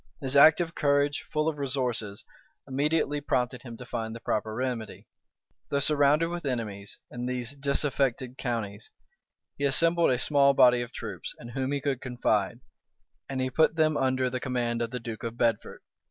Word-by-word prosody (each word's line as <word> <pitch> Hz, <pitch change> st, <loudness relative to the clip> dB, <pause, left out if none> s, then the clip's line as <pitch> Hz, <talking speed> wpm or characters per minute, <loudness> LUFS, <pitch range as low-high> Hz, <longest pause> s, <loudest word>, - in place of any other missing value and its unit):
His 135 Hz, 0 st, -2 dB
active 160 Hz, +3 st, +6 dB
courage, 145 Hz, -1 st, +1 dB
full 150 Hz, +1 st, 0 dB
of 155 Hz, -2 st, -2 dB
resources, 125 Hz, -7 st, -1 dB, 0.4 s
immediately 145 Hz, +2 st, 0 dB
prompted 125 Hz, -2 st, -1 dB
him 120 Hz, -3 st, -9 dB
to 125 Hz, -, -9 dB
find 115 Hz, -2 st, -4 dB
the -, -, -7 dB
proper 110 Hz, -1 st, -2 dB
remedy. 125 Hz, -3 st, -4 dB, 0.6 s
Though 140 Hz, -, 0 dB
surrounded 150 Hz, +3 st, +3 dB
with 175 Hz, 0 st, -5 dB
enemies 110 Hz, -7 st, -4 dB
in 125 Hz, 0 st, -4 dB
these 125 Hz, +1 st, -3 dB
disaffected 135 Hz, -3 st, 0 dB
counties, 110 Hz, -4 st, -4 dB, 0.7 s
he -, -, -3 dB
assembled 165 Hz, +5 st, +3 dB
a 125 Hz, -, +2 dB
small 140 Hz, +1 st, +4 dB
body 125 Hz, -1 st, +6 dB
of 120 Hz, -, -6 dB
troops, -, -, -7 dB
in 120 Hz, -, -10 dB
whom 130 Hz, +2 st, -2 dB
he 145 Hz, -, 0 dB
could 135 Hz, -2 st, -2 dB
confide; 120 Hz, -3 st, -1 dB, 0.7 s
and 135 Hz, -1 st, -3 dB
he 130 Hz, 0 st, -1 dB
put 160 Hz, +4 st, +3 dB
them 155 Hz, -1 st, +2 dB
under 130 Hz, -1 st, +1 dB
the 130 Hz, 0 st, -3 dB
command 120 Hz, -2 st, -2 dB
of 115 Hz, -, -1 dB
the 125 Hz, +1 st, -5 dB
duke 115 Hz, -2 st, -7 dB
of 115 Hz, 0 st, -5 dB
Bedford. 115 Hz, -3 st, -1 dB
130 Hz, 170 wpm, -28 LUFS, 120-145 Hz, 0.7 s, active